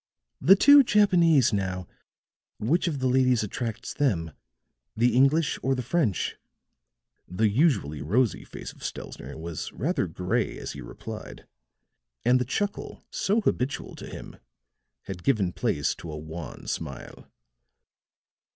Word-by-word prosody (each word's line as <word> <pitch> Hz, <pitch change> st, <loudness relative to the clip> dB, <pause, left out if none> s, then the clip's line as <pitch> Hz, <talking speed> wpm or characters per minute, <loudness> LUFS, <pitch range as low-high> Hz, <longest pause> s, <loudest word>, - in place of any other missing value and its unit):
"The 180 Hz, +9 st, +8 dB
two 285 Hz, +7 st, +8 dB
Japanese 170 Hz, -, +4 dB
now, 95 Hz, -2 st, -2 dB, 0.7 s
which 155 Hz, +12 st, +1 dB
of 155 Hz, -4 st, -1 dB
the 130 Hz, -1 st, 0 dB
ladies 125 Hz, -2 st, +3 dB
attracts 115 Hz, +2 st, -4 dB
them 90 Hz, -, 0 dB, 0.7 s
the 120 Hz, +2 st, +3 dB
English 140 Hz, +5 st, +3 dB
or 135 Hz, 0 st, +1 dB
the 125 Hz, -, -3 dB
French?" 125 Hz, -, 0 dB, 0.9 s
The 105 Hz, +5 st, +1 dB
usually 105 Hz, -, +1 dB
rosy 110 Hz, -, +1 dB
face -, -, -9 dB
of -, -, -16 dB
Stelzner -, -, -7 dB
was 80 Hz, 0 st, -5 dB
rather 145 Hz, -, -1 dB
gray 90 Hz, +8 st, -1 dB
as -, -, -6 dB
he 70 Hz, -, -8 dB
replied, -, -, -9 dB, 0.8 s
and 125 Hz, +1 st, +5 dB
the -, -, 0 dB
chuckle 200 Hz, -, -3 dB
so 210 Hz, +4 st, +1 dB
habitual 130 Hz, -8 st, -1 dB
to -, -, -8 dB
him -, -, -9 dB, 0.7 s
had 90 Hz, -2 st, -7 dB
given 100 Hz, -10 st, +1 dB
place 75 Hz, -, 0 dB
to 85 Hz, -, -8 dB
a 75 Hz, -, -6 dB
wan 80 Hz, -1 st, -8 dB
smile. -, -, -6 dB
125 Hz, 135 wpm, -26 LUFS, 90-150 Hz, 0.9 s, The